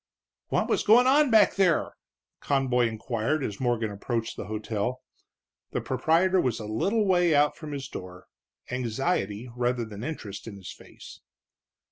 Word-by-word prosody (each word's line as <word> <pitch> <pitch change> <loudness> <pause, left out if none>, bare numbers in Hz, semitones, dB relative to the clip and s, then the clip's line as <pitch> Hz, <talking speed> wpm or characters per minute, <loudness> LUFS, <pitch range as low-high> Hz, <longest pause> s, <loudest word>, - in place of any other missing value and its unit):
"What - - 0
was - - +1
goin' 235 +4 +6
on 285 +2 +5
back 215 -4 +5
there?" 180 -5 +2 0.5
Conboy 130 -3 +1
inquired 115 +6 -2
as 105 -5 -4
Morgan 120 -4 0
approached 115 +3 -3
the - - -6
hotel. 110 +3 -3 0.7
The - - 0
proprietor 165 +8 +2
was 125 -6 -1
a 110 - -6
little 195 - 0
way 175 -4 +3
out 145 +1 +3
from 155 -2 -8
his 140 -2 -5
door, 90 -7 -9 0.5
anxiety, 120 - -2
rather 120 -1 0
than 105 0 -9
interest, 110 -10 -6
in 110 - -7
his 95 -2 -9
face. - - -13
125 Hz, 150 wpm, -27 LUFS, 110-165 Hz, 0.7 s, goin